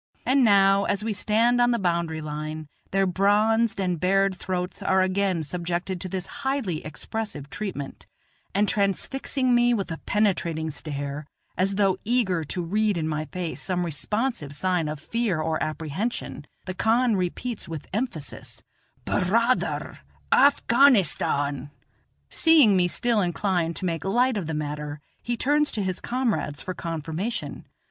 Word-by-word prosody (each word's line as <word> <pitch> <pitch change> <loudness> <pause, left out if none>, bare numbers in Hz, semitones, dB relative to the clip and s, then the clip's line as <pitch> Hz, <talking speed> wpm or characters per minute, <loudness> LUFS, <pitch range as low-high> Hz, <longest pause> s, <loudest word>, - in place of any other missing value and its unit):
And 265 +1 +4
now, 200 -2 +5
as 200 +1 -1
we 220 -1 -1
stand 230 +4 +2
on 240 - +4
the 240 - +2
boundary 170 -5 -1
line, 155 0 -5 0.2
their 195 0 +2
bronzed 205 +4 +2
and 180 -3 0
bared 195 +2 +2
throats 180 0 -4
are 190 0 +3
again 185 -3 0
subjected 175 +3 -3
to 185 - -4
this 185 0 -3 0.2
highly 265 - -1
expressive 150 0 -5
treatment; 190 -10 -6 0.5
and 205 +1 +3
transfixing 250 +6 0
me 240 0 +4
with 195 -5 -3
a 165 - -4
penetrating 170 -6 0
stare, 145 0 -5 0.3
as 195 +2 0
though 195 -2 +2
eager 205 -8 +1
to 175 +4 -3
read 210 +3 +1
in 160 -1 -1
my 155 0 -2
face 180 0 -5
some 180 -2 -1
responsive 170 - -2
sign 180 -1 0
of 150 -1 -4
fear 215 +1 -1
or 160 0 -1
apprehension, 155 +2 -3 0.2
the 185 - -4
khan 225 +4 +2
repeats 195 +6 -3
with 160 -3 -6
emphasis: 210 - -4 0.4
"Bur - - 0
raa 230 +4 +4
ther, - - -4 0.3
Afghanistan." 190 - +3 0.6
Seeing 305 -11 +5
me 180 -1 +3
still 230 +4 +1
inclined 175 -2 0
to 190 - -4
make 165 -3 -2
light 245 +6 +2
of 190 -6 -3
the 160 - -2
matter, 150 0 -4 0.2
he 240 0 -2
turns 295 +4 +2
to 210 - -1
his 185 -1 -2
comrades 235 - -1
for 185 - -5
confirmation. 165 +7 -4
190 Hz, 150 wpm, -25 LUFS, 160-225 Hz, 0.6 s, now